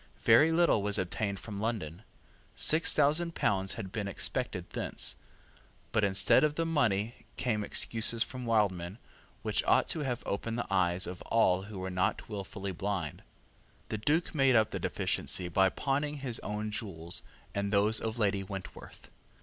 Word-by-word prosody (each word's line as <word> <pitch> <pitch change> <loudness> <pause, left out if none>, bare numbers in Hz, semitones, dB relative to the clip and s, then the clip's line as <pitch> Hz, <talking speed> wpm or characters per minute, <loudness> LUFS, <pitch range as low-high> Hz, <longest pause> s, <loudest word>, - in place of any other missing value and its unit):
Very 130 +8 +6
little 165 -9 +3
was 100 0 +2
obtained 100 +2 -2
from 105 -3 -6
London. 100 -7 -3 0.5
Six 160 +2 +5
thousand 155 +4 +2
pounds 95 -1 +1
had 100 -5 -6
been 105 -2 -3
expected 100 - -2
thence. - - -1 0.8
But 105 - +1
instead 100 +7 +4
of 150 -1 +2
the 165 - 0
money 120 -8 0
came 110 -5 0
excuses 115 +2 +1
from 125 -2 -7
Wildman, 100 -4 +1 0.5
which - - 0
ought - - +4
to - - -2
have 130 -5 -2
opened 115 +3 -3
the 120 - -2
eyes 90 -1 +2
of 90 0 -7
all 95 -5 +3
who 105 - -7
were 95 0 -4
not 90 0 -1
wilfully 100 -2 -5
blind. 95 -4 -3 0.7
The 110 - -3
Duke 155 +10 +1
made 135 -4 +4
up 110 -2 +4
the - - -3
deficiency 90 - -1
by 95 +2 +4
pawning 145 +6 -1
his 130 -4 -4
own 105 +1 -4
jewels 90 -6 -5 0.3
and 100 0 -2
those 105 +2 +3
of 110 +1 -3
Lady 100 -3 +1
Wentworth. 95 -1 -9
105 Hz, 160 wpm, -31 LUFS, 95-120 Hz, 0.8 s, Very